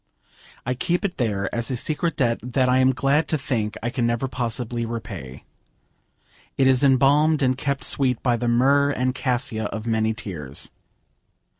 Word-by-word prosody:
I 125 - 0
keep 175 +9 -1
it 190 - -3
there 100 -6 -1
as 120 -1 +1
a 130 - -1
secret 160 +6 -1
debt 115 -3 +1
that 125 +2 0
I 125 +1 +3
am 130 0 +4
glad 140 +4 +1
to 155 - 0
think 115 -6 -2
I 120 - -1
can 120 -2 0
never 120 +3 -1
possibly 120 -1 -3
repay. 95 - -7 1.1
It 135 - +3
is 130 0 +4
embalmed 140 +3 +4
and 130 -1 +2
kept 140 +1 -2
sweet 130 -4 +1
by 120 -2 +2
the 120 +1 -2
myrrh 140 +4 +3
and 130 -2 0
cassia 125 -4 -1
of 110 +1 -5
many 110 -1 0
tears. 75 -10 -5
125 Hz, 170 wpm, -23 LUFS, 115-135 Hz, 1.1 s, am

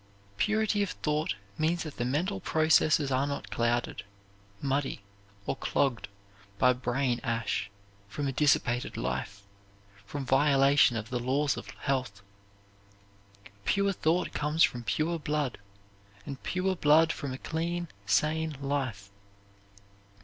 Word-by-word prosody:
Purity 215 - +1
of 200 - 0
thought 150 - -1 0.2
means 165 +2 +1
that 155 -3 -8
the 120 - -1
mental 175 +10 -1
processes 155 -4 +3
are 130 +2 +1
not 140 - -5
clouded, 120 0 0 0.6
muddy, 135 -6 -1 0.4
or - - -1
clogged 130 -5 0 0.5
by 125 +3 +5
brain 125 0 -1
ash 115 -3 -1 0.4
from 140 +7 -3
a - - 0
dissipated 125 -3 +1
life, 100 0 -3 0.6
from 145 -2 -5
violation 135 -2 +4
of 110 +2 -6
the 125 - -1
laws 135 +4 +1
of - - -8
health. 130 -7 -2 1.4
Pure 200 - +2
thought 175 0 0
comes 150 +3 +2
from 120 -1 +1
pure 155 +10 0
blood, 150 -6 -2 0.7
and 140 -1 -7
pure 185 +1 -1
blood 160 0 +5
from 140 -3 -5
a 130 - -4
clean, 170 +4 -3 0.2
sane 155 +7 +1
life. 130 -9 -3
140 Hz, 125 wpm, -29 LUFS, 125-160 Hz, 1.4 s, by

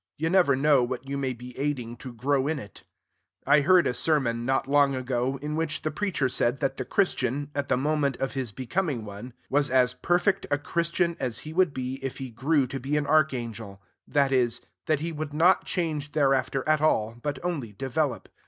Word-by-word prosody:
You 160 +2 -1
never 180 -7 +4
know 140 0 +4
what 125 +2 -3
you 140 - -3
may 135 -2 -1
be 125 +1 -11
aiding 130 -5 -2
to 130 +2 -8
grow 135 +3 0
in 155 0 0
it. 105 -7 -10 0.6
I 145 +2 +5
heard 180 +3 +5
a - - +1
sermon, 120 -4 0
not 135 0 +1
long 140 -1 +3
ago, 130 +1 -1
in 150 +1 -3
which 160 -1 -2
the 155 - -1
preacher 185 -10 0
said 125 +1 0
that 135 -2 -1
the 130 - -3
Christian, 140 - 0
at 145 -1 -2
the - - +3
moment 145 -1 0
of 135 - -2
his 130 -5 -3
becoming 130 - -2
one, 105 +5 -9
was 145 0 +2
as 125 -1 +3
perfect 175 +8 +1
a 145 - +2
Christian 170 +3 0
as 125 -4 -2
he 155 - -6
would 180 -2 +3
be 130 0 -5
if 135 - -4
he 130 -2 -6
grew 140 +4 +1
to 135 +2 -5
be 140 +4 -1
an 150 - 0
archangel; 120 -9 0 0.3
that 140 -2 +2
is, 125 -3 +1 0.3
that 155 -3 +1
he 165 +1 -2
would 150 -2 -5
not 175 +4 +4
change 155 -5 -2
thereafter 135 -2 +1
at 155 -1 +3
all, 115 -8 +2
but 145 +2 -2
only 145 -11 -2
develop. 135 +4 -2
140 Hz, 205 wpm, -26 LUFS, 125-155 Hz, 0.6 s, I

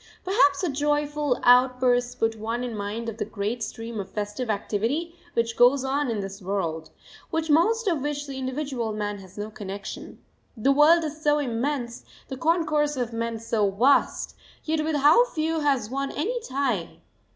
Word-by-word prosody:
] - - -31
Perhaps 380 0 +3
such 300 -7 -2
joyful 295 -2 0
outbursts 250 0 +4
put 225 0 0
one 225 +3 -3
in 240 -3 -4
mind 210 +3 -4
of 225 -1 -5
the - - -1
great 215 +2 -3
stream 225 0 -5
of 195 -1 -5
festive 210 +4 -4
activity 225 +11 -1 0.2
which 230 0 0
goes 255 +3 +5
on 275 0 0
in 220 -3 -1
this 195 +1 -7
world, 175 -5 -3 0.4
with 320 -1 0
most 430 +9 +3
of 330 -7 +1
which 290 0 -3
the 275 -2 -6
individual 260 -4 -3
man 205 -1 -3
has 190 0 -14
no 210 +1 -5
connection. 200 -1 -7 0.4
The 265 +5 +3
world 310 +4 +6
is 310 0 -5
so 295 -1 +3
immense, 245 -2 -2 0.3
the 265 - -4
concourse 300 -2 +1
of 240 -2 -2
men 230 0 -2
so 220 -2 0
vast, 245 +9 +2 0.3
yet 310 -1 0
with 310 0 -1
how 295 - +6
few 325 -8 -1
has 270 -7 0
one 275 +1 -2
any 455 +12 -1
tie! 255 -10 -2
255 Hz, 175 wpm, -25 LUFS, 220-295 Hz, 0.4 s, world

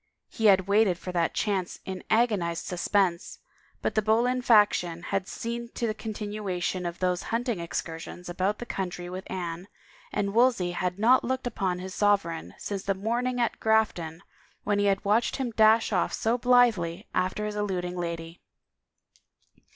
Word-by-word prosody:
He 225 - +1
had 190 -2 +5
waited 200 -3 +3
for 180 - -6
that 170 -2 0
chance 195 -4 -1
in 190 -1 -5
agonized 205 -8 +1
suspense, 180 0 0 0.5
but - - 0
the 215 - +2
Boleyn 235 +4 +2
faction 205 -7 +3
had 195 0 -2
seen 235 0 -5
to 235 - -1
the 220 - 0
continuation 205 -5 -3
of 170 +1 -5
those 180 -1 0
hunting 235 -3 -1
excursions 170 +1 -5
about 185 +4 -1
the 240 - -6
country 180 -4 -4
with 185 +1 -7
Anne, 175 -1 -4 0.4
and 200 0 -1
Wolsey 230 -7 +3
had 180 +1 -2
not 240 +5 +5
looked 260 +1 -2
upon 190 -6 -1
his 185 +1 -7
sovereign 200 -6 0
since 200 -2 -4
the 195 0 -1
morning 240 +5 -1
at 235 -2 0
Grafton 195 -7 +1 0.4
when 205 0 +1
he 205 - +2
had 195 0 +1
watched 215 +4 +2
him 255 -3 -2
dash 220 0 +4
off 180 - +1
so 225 +2 +1
blithely 235 -8 +3
after 185 +3 0
his 210 0 -4
eluding 185 -4 -2
lady. 170 -1 -5
200 Hz, 160 wpm, -27 LUFS, 180-220 Hz, 0.5 s, had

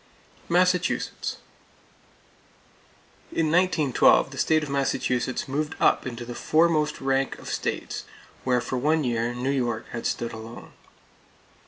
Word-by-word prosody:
Massachusetts: - - +1 1.9
In 155 -2 0
1912 165 -6 +4
the - - -7
state 155 -1 +3
of 150 - -5
Massachusetts 130 -2 -1
moved 150 +3 -2
up - - +3
into 120 -1 -6
the 120 - -6
foremost 155 +2 +2
rank 135 0 0
of - - -12
states, - - -3 0.4
where 125 -1 +2
for 125 +1 -3
one 155 +4 +2
year 120 -1 -1
New 125 +3 -1
York 120 -5 -1
had 115 - -3
stood 115 -1 -3
alone. 110 +1 -9
135 Hz, 125 wpm, -25 LUFS, 120-150 Hz, 1.9 s, 1912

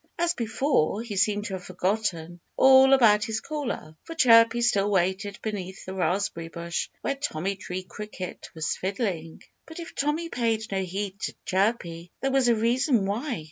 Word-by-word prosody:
As 340 0 +1
before, 230 - 0
he 225 -4 -6
seemed 205 +1 +1
to 205 - -4
have 185 -1 -5
forgotten 180 -2 -2 0.2
all 265 0 +7
about 215 -6 +5
his 220 0 -2
caller; 260 - -5
for 330 - -8
Chirpy 230 -4 +6
still 205 -4 +2
waited 195 +1 0
beneath 195 -3 -5
the 190 - -6
raspberry 185 -2 -1
bush 170 +1 -4
where - - 0
Tommy 200 - -3
Tree 185 -1 -6
Cricket 195 -1 -8
was 160 0 -1
fiddling. 185 -5 -3 0.2
But 320 +1 -9
if 335 - -8
Tommy 300 +4 -1
paid 225 -5 0
no 195 -1 0
heed 195 +2 -4
to - - -4
Chirpy, 185 -4 -1
there 270 - -1
was 265 -2 +3
a 235 - +4
reason 235 0 +2
why. 230 - -2
210 Hz, 170 wpm, -26 LUFS, 185-240 Hz, 0.2 s, all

